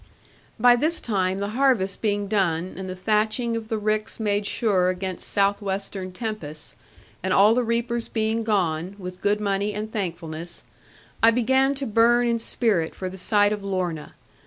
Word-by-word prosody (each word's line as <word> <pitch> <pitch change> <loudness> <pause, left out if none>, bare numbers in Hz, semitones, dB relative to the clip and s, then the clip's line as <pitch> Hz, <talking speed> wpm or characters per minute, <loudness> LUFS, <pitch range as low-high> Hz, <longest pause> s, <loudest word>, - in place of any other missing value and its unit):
By 245 +1 +7
this 310 +7 +2
time, 190 -4 0
the 200 +1 -2
harvest 230 -5 +1
being 205 -2 0
done, 185 -4 0
and 190 0 -6
the 185 - -5
thatching 215 +4 0
of 225 -1 -4
the 220 - -1
ricks 215 +1 -1
made 205 -1 0
sure 190 -6 +1
against 185 0 -4
south 200 0 +1
western 195 -1 -4
tempests, 180 -7 -6 0.5
and 190 - -2
all 205 +4 +6
the 250 - +2
reapers 235 0 -1
being 220 0 -1
gone, 185 -4 0
with 180 -2 -8
good 205 +1 +1
money 200 0 -1
and 215 +1 -4
thankfulness, 170 -4 -4 0.6
I 225 - +7
began 265 +4 +2
to 275 0 -4
burn 235 +1 +4
in 235 -1 +1
spirit 210 -8 0
for 185 - -4
the 190 - -9
sight 205 +2 +3
of 205 -1 -5
Lorna. 180 -6 -3
205 Hz, 170 wpm, -24 LUFS, 185-225 Hz, 0.6 s, By